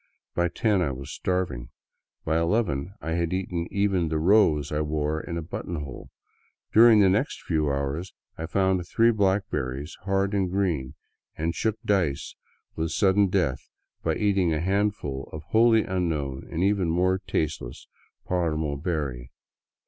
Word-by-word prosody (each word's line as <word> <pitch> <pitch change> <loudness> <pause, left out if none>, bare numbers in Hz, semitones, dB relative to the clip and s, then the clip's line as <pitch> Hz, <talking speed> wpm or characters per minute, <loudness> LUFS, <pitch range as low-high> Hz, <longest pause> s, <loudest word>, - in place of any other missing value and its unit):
By 85 0 +1
ten 105 +1 +1
I 80 - +1
was 65 0 -6
starving. 80 -11 -2 0.6
By 80 +1 +2
eleven 85 -2 0
I 80 - -4
had 85 +1 0
eaten 90 -2 -2
even 100 -4 +1
the 80 - 0
rose 80 -4 +3
I 75 0 0
wore 75 0 -1
in 85 - -5
a 85 - -3
button 85 +2 -5
hole; 70 -5 -7 0.6
during 115 0 +8
the 100 - +6
next 105 +9 0
few 75 -4 0
hours 70 +6 -2 0.2
I 80 - -5
found 95 0 +1
three 115 +4 +4
blackberries, 95 - -1
hard 95 +1 0
and 95 -3 +1
green, 85 -9 -1 0.4
and 80 +1 -1
shook 110 +2 -1
dice 90 -9 0 0.4
with 80 0 -1
sudden 100 +2 +3
death 90 -9 -1 0.3
by - - 0
eating 100 -5 +2
a 80 - 0
handful 95 -7 -1
of 80 0 -7
a 85 - -34
wholly 115 0 +5
unknown 80 -8 -2
and 85 - -1
even 100 -3 +2
more 90 +3 +2
taste 85 -5 -2
less - - -9 0.4
paramo 80 -5 -1
berry. 70 -7 -3
85 Hz, 155 wpm, -26 LUFS, 75-95 Hz, 0.6 s, during